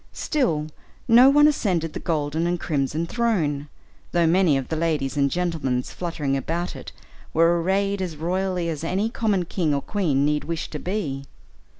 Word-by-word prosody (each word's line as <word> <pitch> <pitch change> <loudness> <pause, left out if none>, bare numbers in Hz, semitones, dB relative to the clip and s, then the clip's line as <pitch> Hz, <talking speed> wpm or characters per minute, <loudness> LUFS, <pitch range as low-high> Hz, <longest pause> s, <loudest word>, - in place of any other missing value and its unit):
Still 230 - 0 0.4
no 245 +3 +8
one 295 +2 +6
ascended 180 - 0
the - - -4
golden 155 0 -1
and 175 0 -1
crimson 150 +2 -1
throne, 165 -10 0 0.5
though 170 -1 +3
many 165 -3 +4
of 135 - -4
the 160 - -1
ladies 155 -5 -1
and 140 -1 +2
gentlemen 155 -7 -1
fluttering 155 -5 -3
about 165 +6 -3
it - - -9 0.4
were 170 +1 +4
arrayed 195 +2 0
as 175 -4 -4
royally 180 +2 -1
as 160 -2 -4
any 195 +7 -1
common 205 -7 0
king 165 -4 0
or 140 - -1
queen 155 -10 +1
need 150 0 +1
wish 165 -1 -4
to 150 - -4
be. 150 -9 -3
165 Hz, 170 wpm, -24 LUFS, 150-190 Hz, 0.5 s, no